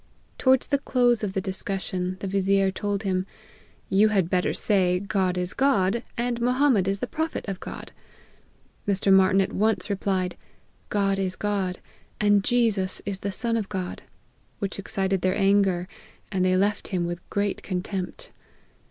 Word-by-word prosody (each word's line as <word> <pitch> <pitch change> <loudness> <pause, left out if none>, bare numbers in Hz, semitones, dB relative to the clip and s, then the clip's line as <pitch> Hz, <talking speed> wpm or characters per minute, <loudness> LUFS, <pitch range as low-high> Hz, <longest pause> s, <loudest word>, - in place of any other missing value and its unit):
Towards 260 -1 +4
the 280 -1 +1
close 245 -4 +2
of 195 -2 -2
the 190 - -1
discussion 185 -1 -3
the - - -3
vizier 195 0 +2
told 205 +1 -2
him, 185 -1 -1 0.3
" - - -28 0.3
You 205 +3 +4
had 195 -5 +1
better 180 -1 +2
say, 185 -4 +2
God 190 -2 0
is 180 0 -1
God, 230 -5 +2 0.2
and 240 0 -1
Mohammed 250 -5 +3
is 195 0 -1
the - - 0
prophet 320 -5 -3
of 195 -2 -4
God - - -8 0.5
;" - - -36
Mr. 195 -1 +3
Martyn 190 0 +5
at 190 - -2
once 215 +1 +1
replied, 190 -2 -1 0.3
" - - -38
God 195 -1 +1
is: 185 -1 -1
God, 195 -3 -1 0.4
and 205 -1 +4
Jesus 220 -6 +1
is 195 -2 -3
the 200 - -3
Son 230 +4 0
of 220 -3 -2
God," 185 -3 -4 0.6
which 200 -1 -4
excited 195 -1 -1
their 185 0 +1
anger, 195 -3 +3 0.4
and 190 -2 +1
they 185 0 +3
left 205 +2 0
him 180 -3 -1
with 175 0 -6
great 200 -1 -1
contempt. 190 - -4
195 Hz, 170 wpm, -25 LUFS, 185-210 Hz, 0.6 s, Martyn